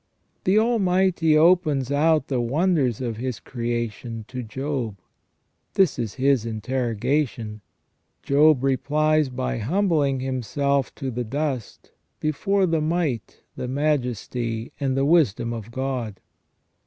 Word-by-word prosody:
The 190 +3 +4
Almighty 190 -8 +3
opens 155 -5 +3
out 155 0 +3
the 130 -3 0
wonders 135 - +1
of 115 -4 -3
His 125 -1 -3
creation 120 -2 -4
to 125 -1 -5
Job. 125 -2 -4 0.8
This 185 -9 +3
is 115 -4 -3
His 135 -3 +2
interrogation. 115 0 -2 0.6
Job 145 -1 +4
replies 150 +2 +2
by 65 - -3
humbling 150 - +1
him 130 0 -2
self 140 +3 0
to 135 -3 -4
the 125 +1 -3
dust 135 -1 -4 0.3
before 195 +6 +1
the 165 -3 +1
Might, 155 -7 -2
the 125 - -4
Majesty, 125 -4 -1
and 135 -2 0
the 135 - +2
Wisdom 135 - +2
of 115 -1 -7
God. 125 -5 -3
135 Hz, 120 wpm, -24 LUFS, 120-155 Hz, 0.8 s, The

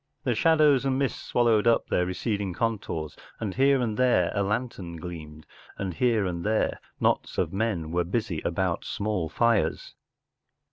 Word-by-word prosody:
The 125 - +1
shadows 150 0 +4
and 135 -1 +1
mists 135 -1 -1
swallowed 120 -2 +3
up 115 - +3
their 90 - 0
receding 100 -1 -2
con¬ 115 +1 0
tours, 80 -5 -5 0.2
and 105 -4 -3
here 135 +3 +4
and 110 -4 -1
there 125 -9 +3
a 100 - 0
lantern 100 -4 -3
gleamed, 80 -2 -8 0.3
and 95 -2 -3
here 110 +3 +2
and 85 -2 -3
there 110 +1 0 0.2
knots - - 0
of - - 0
men 95 -6 -1
were 90 +1 +1
busy 95 -2 -2
about 85 0 -1
small 100 -6 -2
fires. 115 +1 +1
105 Hz, 160 wpm, -26 LUFS, 90-120 Hz, 0.3 s, shadows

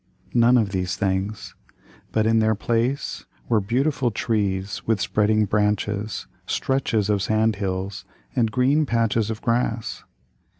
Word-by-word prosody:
None 120 +1 +5
of 105 -4 +1
these 90 -2 -1
things. 100 +2 -2 0.6
But 110 -1 +1
in 115 0 +4
their 110 0 +3
place 120 +6 -1 0.2
were 110 -3 +2
beautiful 130 +5 +1
trees 100 -3 -1
with 110 -3 +2
spreading 110 +2 +2
branches, 105 0 -1 0.2
stretches 125 -6 0
of 105 -2 +1
sand 110 0 +1
hills, 95 0 -3 0.3
and 115 -2 +2
green 135 +6 +2
patches 115 -2 +1
of 110 0 -5
grass. 115 -1 -1
110 Hz, 130 wpm, -23 LUFS, 100-115 Hz, 0.6 s, None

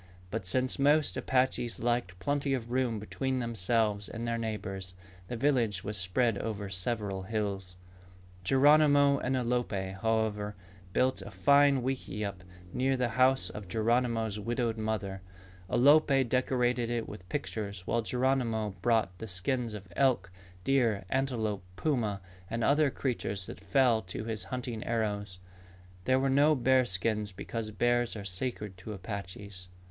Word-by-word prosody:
But 105 -3 -3
since 130 +8 0
most 145 +2 +3
Apaches 125 -3 0
liked 120 -6 -1
plenty 140 +4 0
of 120 -2 -6
room 125 -3 +1
between 130 +5 -2
themselves 110 -3 0
and 115 +1 -5
their 115 0 -1
neighbors, 95 -4 -5 0.3
the 120 - -4
village 115 -7 +1
was 105 +1 -4
spread 100 +3 +1
over 100 -3 -4
several 100 0 -2
hills. 100 -3 -3 0.7
Geronimo 145 +3 +5
and 130 +1 0
Alope, 120 -6 -1
however, 110 -2 0 0.4
built 130 +7 +1
a - - -8
fine 140 +6 +4
wickiup 105 -6 -3
very 90 - -18 0.3
near 130 +1 +1
the 125 -1 +1
house 130 +3 +3
of 105 -2 -8
Geronimo's 115 0 +1
widowed 115 +1 -1
mother. 105 -3 -3 0.5
Alope 140 +1 +5
decorated 125 -1 +1
it 120 -1 -2
with 90 -4 -10
pictures 100 -9 -4
while 115 - +1
Geronimo 115 -1 0
brought 110 -3 +2
the 110 - -6
skins 110 +4 -1
of 100 -2 -9
elk, 130 -9 +2 0.3
deer, 115 -7 +2
antelope, 115 -7 -1
puma, 110 -8 0 0.3
and 115 +1 -2
other 150 +3 +4
creatures 115 -8 -2
that - - -8
fell 115 +4 +3
to 95 +2 -6
his 110 -4 -3
hunting 120 +1 -4
arrows. 105 -4 -2 0.7
There 130 0 +3
were 135 - +1
no 145 +3 +4
bear 130 0 +4
skins 105 0 -1
because 110 +3 -5
bears 120 +2 +1
are 100 -2 -6
sacred 100 0 -4
to 105 +4 -7
Apaches. 95 -1 -7
115 Hz, 140 wpm, -30 LUFS, 100-130 Hz, 0.7 s, Geronimo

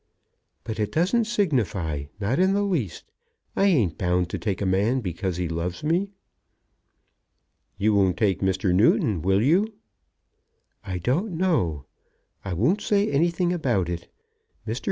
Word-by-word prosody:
"But 110 -1 -5
it 105 -1 -1
doesn't 190 - +2
signify, 110 - -1
not 105 - 0
the 195 +2 +3
least. 160 - -2 0.5
I 195 - +3
ain't 115 - +2
bound 90 -1 0
to - - -3
take 100 -5 -2
a 100 - -1
man 100 +7 +2
because 90 -2 -3
he 90 -1 -1
loves 85 - -4
me." 175 +6 +1 1.7
"You 105 +2 +2
won't 95 -3 +2
take 100 -4 +1
Mr. 95 0 +1
Newton; 100 -2 +3
will 95 +4 +2
you?" 195 - +2 1.1
"I 95 -2 -4
don't 150 - -1
know. 90 - 0 0.6
I 95 - -5
won't 130 - +1
say 205 -1 +1
anything 170 +4 +1
about 120 - 0
it. 85 -1 -5 0.6
Mr. 115 +4 -2
110 Hz, 140 wpm, -25 LUFS, -, 1.7 s, the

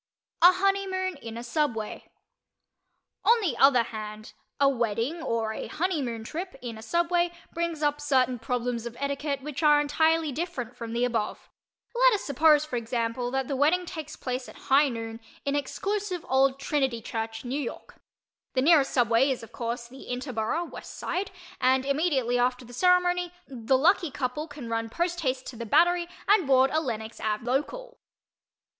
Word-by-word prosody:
A 355 +2 +9
HONEYMOON 375 -2 0
IN 230 -4 -8
A 235 - -6
SUBWAY 240 -4 -2 1.1
On 470 +1 +5
the 355 - -1
other 270 -3 +6
hand, 215 -1 -8 0.3
a 280 - +5
wedding 240 +5 0
or 225 -6 -1
a - - -5
"honeymoon" 290 -10 -2
trip 345 +9 -5
in 240 -3 -6
a 220 - -10
subway 345 +7 +1 0.2
brings 335 -2 -2
up 295 0 +1
certain 260 -4 +2
problems 240 0 -2
of 235 0 -9
etiquette 280 0 -2
which 295 -1 -5
are 295 -1 +6
entirely 315 +1 +2
different 265 -5 -4
from 230 -1 -6
the 240 +1 +1
above. 230 -4 -3 0.4
Let - - +5
us 410 - -1
suppose, 300 +1 +4
for 255 -5 -3
example, 235 +1 -2
that 265 0 -1
the 275 - -2
wedding 315 +7 +3
takes 315 -3 -7
place 255 0 -4
at - - -13 0.2
high 280 +1 +6
noon 225 -2 -5 0.3
in 280 0 0
exclusive 385 +5 -2
old 265 +1 +3
"Trinity" 270 -4 0
church, 225 0 -4
New 270 +4 -2
York. 245 - -7 0.6
The 255 - +2
nearest 300 -3 +5
subway 240 +1 +3
is 260 -3 -2
of 225 - -11
course 235 0 -4
the 265 +2 -12
"Interborough" 250 +5 -2
(West - - -9
Side) 380 +2 -2 0.3
and 260 +1 +3
immediately 275 -4 +1
after 250 0 0
the 245 - -13
ceremony 360 +2 +2
the 260 0 +1
lucky 340 +4 +3
couple 280 +3 -3
can 285 -5 -9
run 225 0 -2
poste 345 +6 -1
haste 260 -4 -1
to 255 - -7
the 235 - -5
"Battery" 350 +7 +4 0.2
and 405 -7 +4
board 265 0 +5
a 315 - +2
Lenox 225 -5 -5
Ave. 215 +1 -2
Local. - - -2
270 Hz, 170 wpm, -27 LUFS, 235-330 Hz, 1.1 s, A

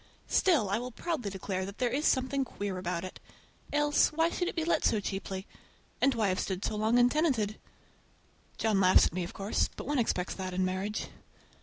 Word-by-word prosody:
Still 315 - +3
I 200 +3 0
will 250 +1 -5
proudly 250 -3 -3
declare 190 -1 -3
that 200 +2 -7
there 245 -2 0
is 290 +5 +1
something 265 +1 +1
queer 200 -6 -4
about 180 -1 -3
it. 185 - -8 0.5
Else, 295 0 +3
why 325 +2 +1
should 355 - -1
it - - -3
be 325 -2 -1
let 340 - +1
so 215 - +3
cheaply? 195 -1 -4 0.6
And 275 -2 +4
why 215 -3 +2
have 185 - 0
stood 190 0 -2
so - - -1
long 220 +3 +2
untenanted? 245 -5 +2 1.0
John 215 -3 +2
laughs 185 0 +6
at - - -2
me, 180 0 -2
of 175 - -7
course, 200 +2 0
but - - -7
one 290 -1 0
expects 185 -5 0
that 185 -1 -5
in 185 0 +1
marriage. 190 +3 -3
215 Hz, 200 wpm, -30 LUFS, 190-270 Hz, 1.0 s, laughs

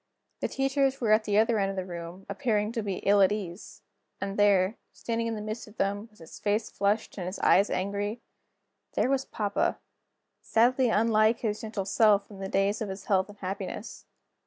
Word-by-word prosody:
The - - -1
teachers 270 0 +1
were 225 -4 +1
at 215 0 +4
the 205 -1 +1
other 225 0 +3
end 195 -1 +1
of 195 - -4
the 185 -1 -3
room, 175 +1 -8
appearing 215 -5 0
to 230 -1 -2
be 200 -3 -4
ill 200 0 +5
at 190 0 +5
ease. 195 -3 -6 0.4
And 200 0 -3
there, 205 0 +3
standing 230 0 -3
in 225 - -2
the 210 - -5
midst 215 +2 -5
of 210 - -16
them, 205 +2 -1
with 210 - -25
his 165 -1 -12
face 210 +2 0
flushed 205 +1 -1
and 180 - -4
his 185 - -4
eyes 200 +2 +4
angry 205 +4 -2 0.8
there 260 - +2
was 270 0 +1
papa, 205 -2 -1 0.6
sadly 245 +2 +3
unlike 220 0 +3
his 215 -2 -2
gentle 215 -3 -4
self 205 0 +3
in 200 - -11
the 195 0 -4
days 200 +3 +1
of 215 - -2
his 190 0 -7
health 190 -1 +2
and 205 - -12
happiness. 195 +2 -6
205 Hz, 200 wpm, -28 LUFS, 195-225 Hz, 0.8 s, ill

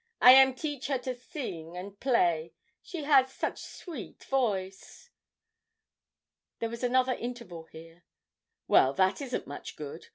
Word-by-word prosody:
'I 250 - +10
am 265 0 +7
teach 290 -1 -4
her 275 -2 +1
to 255 0 -4
sing 180 - -7
and 195 +2 -8
play 170 -11 +1 0.3
she 335 -4 -7
has 270 -3 +4
such - - -3
sweet 315 - -9
voice! 210 - -2 1.5
There 230 - -2
was 235 +1 -7
another 255 +1 +2
interval 235 -10 -7
here. 165 +2 -14 0.6
'Well, 130 - +5
that 190 - +2
isn't 255 -3 -3
much 145 - -8
good. 150 +2 -8
240 Hz, 135 wpm, -29 LUFS, 175-265 Hz, 1.5 s, I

